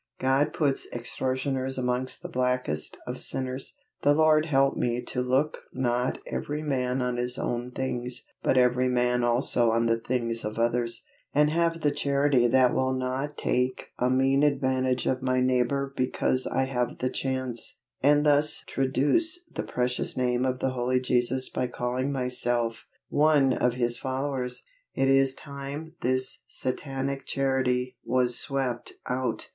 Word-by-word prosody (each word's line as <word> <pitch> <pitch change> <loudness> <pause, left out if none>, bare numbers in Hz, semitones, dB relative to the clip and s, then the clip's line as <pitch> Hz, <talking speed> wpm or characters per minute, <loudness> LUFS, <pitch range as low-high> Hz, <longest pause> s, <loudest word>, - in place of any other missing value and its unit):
God 135 +3 +2
puts 140 -4 0
extortioners 130 +2 -2
amongst 125 0 -2
the - - -4
blackest 125 -12 -1
of - - -5
sinners. 130 - -2 0.3
The 145 0 +4
Lord 155 0 +4
help 135 -2 +3
me 120 0 0
to 125 - -3
"Look 130 +5 +1
not 125 0 0
every 150 +1 -3
man 130 -3 0
on 125 -1 -1
his 125 +1 0
own 120 +1 -2
things, 125 -1 -3 0.2
but - - +2
every 125 0 +4
man 125 -1 +2
also 120 0 +3
on 115 +1 +2
the 115 0 +2
things 115 -1 -2
of 105 +1 -4
others," 115 0 0 0.3
and 150 +1 +4
have 165 0 +1
the 145 - +2
Charity 140 -3 +2
that 125 +1 +4
will 130 0 +1
not 130 +3 -3
take 125 +1 -1
a 125 - +2
mean 135 +2 +3
advantage 130 -3 +1
of 130 0 0
my 130 0 +1
neighbor 130 +2 +1
because 130 0 0
I - - +1
have 125 -2 -2
the 130 - -1
chance, 130 -3 -3 0.2
and 145 +2 +4
thus 150 +1 +2
traduce 145 - +1
the - - -2
precious 125 0 -2
name 125 0 +1
of 130 -1 0
the 130 - +1
Holy 125 0 +1
Jesus 125 +1 +1
by 125 - -2
calling 125 +3 -2
myself 120 -3 -1 0.2
one 145 -3 +4
of 125 -1 +1
His 120 -1 -1
followers. 130 -1 -3 0.3
It 135 - +2
is 135 0 +4
time 140 +2 -7
this 130 +1 +1
satanic 135 +1 -3
Charity 130 -2 0
was 125 0 +2
swept 130 -4 -3
out! 130 0 -2
130 Hz, 150 wpm, -27 LUFS, 125-135 Hz, 0.3 s, The